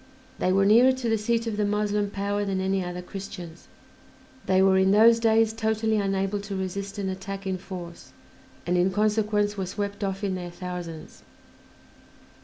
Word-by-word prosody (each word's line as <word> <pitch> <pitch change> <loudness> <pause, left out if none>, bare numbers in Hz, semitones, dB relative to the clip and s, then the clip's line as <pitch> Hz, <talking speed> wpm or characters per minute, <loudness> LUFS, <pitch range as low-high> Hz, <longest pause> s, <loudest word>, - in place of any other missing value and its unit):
They 185 - +1
were 195 +1 +3
nearer 240 +6 +6
to 260 -3 -3
the 225 - +2
seat 230 +2 0
of 220 -2 -3
the 210 - +1
Moslem 205 0 0
power 205 +1 -2
than 195 -2 -1
any 190 0 0
other 180 0 -5
Christians; 180 -3 -9 0.8
they 185 0 +3
were 190 0 +5
in 190 0 +3
those 225 +3 +6
days 225 -1 +3
totally 220 -1 0
unable 195 0 0
to 200 0 -6
resist 195 +2 -4
an 200 -1 -2
attack 195 +1 -5
in 190 -1 -2
force, 175 -2 -9 0.5
and 180 +1 +1
in 180 +2 +3
consequence 210 0 +1
were 190 -2 -2
swept 205 +2 -4
off 195 +1 -3
in 195 -2 0
their 180 -1 -5
thousands. 175 -3 -7
200 Hz, 175 wpm, -26 LUFS, 190-210 Hz, 0.8 s, nearer